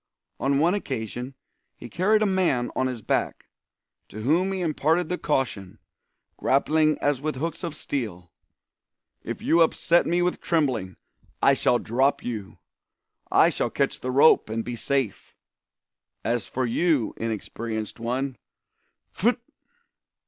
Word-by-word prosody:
On 140 0 +1
one 165 +5 +3
occasion 125 - -4 0.4
he 120 - -10
carried 210 - +2
a - - +3
man 180 -11 +1
on 130 - +1
his 125 -4 -5
back, - - -1 0.6
to 110 - -8
whom 170 - +2
he 190 - -2
imparted 160 +1 +1
the 180 - -1
caution, 125 - -2 0.6
"grappling 155 +3 +2
as 145 -3 0
with 155 -1 -2
hooks 165 +6 -4
of 165 -3 -4
steel": 105 - -5 0.9
"If - - -6
you 170 - +4
upset 170 +1 +3
me 175 +1 +2
with 180 - -1
trembling, 130 - 0 0.4
I - - +5
shall 120 - +2
drop 130 +5 +1
you! 110 -5 -5 0.7
I - - +5
shall - - -1
catch - - -1
the 130 - -4
rope 135 -1 +5
and 115 +1 -3
be 120 - -4
safe! 135 -3 -2 0.9
As 115 -4 -1
for 130 +5 -2
you, 140 +1 +1
inexperienced 110 0 -4
one 125 +3 -2 0.8
_pfitt! 240 +5 +2
135 Hz, 135 wpm, -25 LUFS, 115-165 Hz, 0.9 s, I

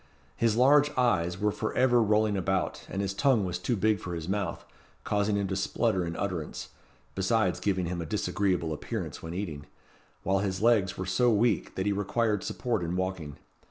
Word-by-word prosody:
His 115 -2 +2
large 145 +4 +5
eyes 95 -8 +1
were 105 0 +2
for 110 - -3
ever 125 -1 +4
rolling 105 -1 +2
about, 95 -1 -1
and 100 - -2
his 95 -1 -2
tongue 120 -2 +2
was 90 -1 -3
too 120 +6 0
big 105 0 +2
for 90 0 -5
his 80 -1 -5
mouth, 95 -3 -2 0.4
causing 105 0 +1
him 100 -1 0
to 95 - -1
splutter 95 -1 0
in 85 - -4
utterance, 90 -6 -4 0.4
besides 95 -1 +1
giving 95 -3 0
him 85 0 -3
a 80 - -5
disagreeable 90 -2 0
appearance 75 - -5
when 80 +1 -6
eating; 80 -7 -5 0.6
while 95 +1 +2
his 95 -1 -2
legs 105 -4 +3
were 95 - -3
so 95 +7 +2
weak, 110 0 +1
that 95 - -2
he 105 - +2
required 105 +1 0
support 120 -6 -2
in 85 +1 -2
walking. 90 -6 -3
95 Hz, 190 wpm, -28 LUFS, 90-110 Hz, 0.6 s, large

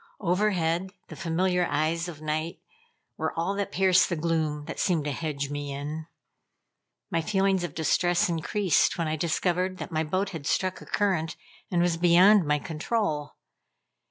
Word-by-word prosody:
Overhead, 180 -1 0
the - - -8
familiar 180 0 0
eyes 160 +3 0
of 155 -3 -9
night 155 +2 -2 0.6
were - - -3
all 170 +4 0
that 200 0 -3
pierced 185 -1 +4
the 175 - 0
gloom 155 -2 -1
that 165 - -6
seemed 165 -6 +1
to 145 - -1
hedge 140 -1 -3
me 145 -1 -4
in. 150 +3 -5 1.0
My 165 - +1
feeling 195 0 +1
of 175 - -5
distress 175 +3 +2
increased 175 +2 +1
when 165 -2 -1
I 155 - 0
discovered 180 +3 0
that - - -7
my 160 0 0
boat 185 +5 -1
had 160 -6 -6
struck 185 +2 0
a - - -12
current 185 -6 0 0.3
and 175 -2 +2
was 175 -1 +1
beyond 180 +2 +6
my 150 0 +3
control. 160 -1 -2
170 Hz, 160 wpm, -27 LUFS, 155-185 Hz, 1.0 s, beyond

